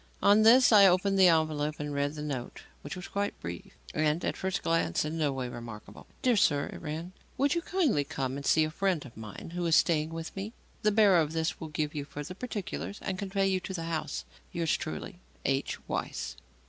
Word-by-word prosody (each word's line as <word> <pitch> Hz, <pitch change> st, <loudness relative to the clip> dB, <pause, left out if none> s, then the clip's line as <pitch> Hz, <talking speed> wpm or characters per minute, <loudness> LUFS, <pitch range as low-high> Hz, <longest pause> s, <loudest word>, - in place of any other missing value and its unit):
On 205 Hz, +2 st, +6 dB
this, 235 Hz, +2 st, +7 dB
I 205 Hz, -3 st, +9 dB
opened 195 Hz, +2 st, +3 dB
the 185 Hz, -, +8 dB
envelope 155 Hz, -2 st, +2 dB
and 150 Hz, 0 st, -3 dB
read 145 Hz, +1 st, -1 dB
the 150 Hz, -, -5 dB
note, 135 Hz, -5 st, -5 dB, 0.2 s
which 145 Hz, -, -6 dB
was 180 Hz, +1 st, -7 dB
quite 200 Hz, 0 st, -2 dB
brief, 85 Hz, 0 st, -7 dB, 0.2 s
and, 155 Hz, +2 st, +1 dB
at -, -, -1 dB
first 190 Hz, +1 st, -2 dB
sight, 160 Hz, -, +1 dB
in 160 Hz, +2 st, -3 dB
no 150 Hz, -3 st, +2 dB
way 130 Hz, -2 st, -3 dB
remarkable. 115 Hz, -3 st, -9 dB, 0.2 s
"DEAR 250 Hz, -2 st, +4 dB
SIR," 145 Hz, -8 st, +2 dB
it -, -, -9 dB
ran, 160 Hz, +3 st, -5 dB, 0.3 s
"Would 280 Hz, +1 st, +3 dB
you 340 Hz, -, 0 dB
kindly 330 Hz, -, +1 dB
come 135 Hz, -1 st, -3 dB
and 140 Hz, -, -5 dB
see 155 Hz, +3 st, +4 dB
a 155 Hz, -, -1 dB
friend 185 Hz, -3 st, 0 dB
of 120 Hz, -, -12 dB
mine 110 Hz, +7 st, -9 dB
who 175 Hz, 0 st, -2 dB
is 165 Hz, -, +4 dB
staying 155 Hz, -2 st, +3 dB
with 165 Hz, 0 st, -6 dB
me? 200 Hz, +3 st, -5 dB, 0.3 s
The 210 Hz, -, +3 dB
bearer 200 Hz, -4 st, +5 dB
of 155 Hz, -1 st, 0 dB
this 160 Hz, 0 st, -1 dB
will 160 Hz, -, -5 dB
give 150 Hz, -1 st, -2 dB
you 145 Hz, -2 st, -4 dB
further 145 Hz, +4 st, -7 dB
particulars 205 Hz, -2 st, -5 dB
and 185 Hz, -1 st, -3 dB
convey 195 Hz, 0 st, 0 dB
you 190 Hz, -1 st, +2 dB
to 185 Hz, +1 st, -6 dB
the 165 Hz, -, -3 dB
house. 160 Hz, -2 st, -3 dB, 0.3 s
Yours 165 Hz, -1 st, +1 dB
truly, 175 Hz, +3 st, -6 dB, 0.3 s
H. 135 Hz, 0 st, 0 dB
WEISS." -, -, -3 dB
165 Hz, 215 wpm, -30 LUFS, 150-195 Hz, 0.3 s, I